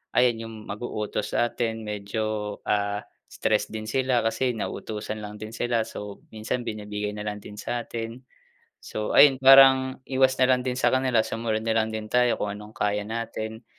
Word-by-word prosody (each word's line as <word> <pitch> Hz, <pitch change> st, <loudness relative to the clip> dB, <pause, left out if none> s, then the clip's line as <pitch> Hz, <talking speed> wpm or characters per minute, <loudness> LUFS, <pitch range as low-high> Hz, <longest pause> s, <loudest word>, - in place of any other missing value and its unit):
ayan 120 Hz, -2 st, +3 dB
yung 115 Hz, -, -9 dB
mag-uutos 105 Hz, 0 st, -4 dB
sa'tin 115 Hz, -2 st, -1 dB
medyo, 105 Hz, 0 st, -3 dB
ah, 105 Hz, 0 st, 0 dB, 0.2 s
stress -, -, 0 dB
din 110 Hz, -1 st, -6 dB
sila 130 Hz, -1 st, +1 dB
kasi 115 Hz, +3 st, +1 dB
nauutusan 110 Hz, 0 st, -5 dB
lang 105 Hz, 0 st, -7 dB
din 110 Hz, +1 st, -8 dB
sila. 115 Hz, 0 st, 0 dB
So, 105 Hz, -2 st, -8 dB
minsan 110 Hz, +3 st, -3 dB
binibigay 105 Hz, -1 st, -4 dB
na 105 Hz, 0 st, -6 dB
lang 105 Hz, 0 st, -3 dB
din 105 Hz, -, -10 dB
satin. 120 Hz, +1 st, -5 dB, 0.6 s
So 105 Hz, -, -3 dB
ayun, 135 Hz, -3 st, +7 dB
parang 130 Hz, -1 st, +7 dB
iwas 130 Hz, 0 st, +2 dB
na -, -, +2 dB
lang 125 Hz, -, +4 dB
din 125 Hz, 0 st, -2 dB
sa 130 Hz, -, +2 dB
kanila 130 Hz, -4 st, +2 dB
sumunod 110 Hz, -1 st, -2 dB
na 115 Hz, -, 0 dB
lang 110 Hz, 0 st, +2 dB
din 110 Hz, -1 st, -6 dB
tayo 125 Hz, -1 st, +3 dB
kung 105 Hz, -, -3 dB
anong 105 Hz, +2 st, -10 dB
kaya 105 Hz, -1 st, 0 dB
natin. 110 Hz, 0 st, -5 dB
110 Hz, 170 wpm, -26 LUFS, 105-125 Hz, 0.6 s, ayun